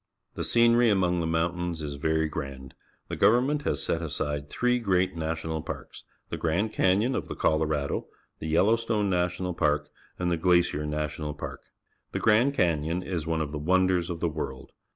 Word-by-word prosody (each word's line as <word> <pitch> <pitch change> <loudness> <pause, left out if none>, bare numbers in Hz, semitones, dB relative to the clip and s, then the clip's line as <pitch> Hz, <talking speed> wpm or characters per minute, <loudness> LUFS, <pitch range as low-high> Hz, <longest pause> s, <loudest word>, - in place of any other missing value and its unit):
The - - -4
scenery 120 0 +4
among 90 -3 +2
the 80 - -1
mountains 85 +1 -1
is 75 -2 -4
very 80 +2 0
grand. 70 -3 -6 0.3
The - - -4
government 130 +6 +3
has - - 0
set 85 - -1
aside 75 -2 -3
three 125 +6 +1
great 95 -5 +1
National 80 0 -3
Parks 80 - -8
— - - -46
the - - -2
Gran 85 +7 0
d - - -19
Canyon 100 +7 +2
of - - -2
_the - - -6
Colorado, 75 -2 0 0.3
the 80 - -5
Yellows 105 +9 +3
tone 105 -4 0
N 90 0 +2
ational 90 0 -4
Parjc^ 75 -1 +1 0.3
_and 90 -1 0
the 85 - +1
Glacier 85 -3 +2
National 75 0 -3
Park. - - -7 0.5
The - - -1
Grand 120 +6 +3
Canyon 85 - +1
is 85 -5 -3
one 80 -1 0
of 75 -2 -3
the 75 - -4
wonders 90 +2 +2
of 85 -1 -5
the 85 - +2
world. 70 -5 -5
85 Hz, 190 wpm, -27 LUFS, 75-95 Hz, 0.5 s, scenery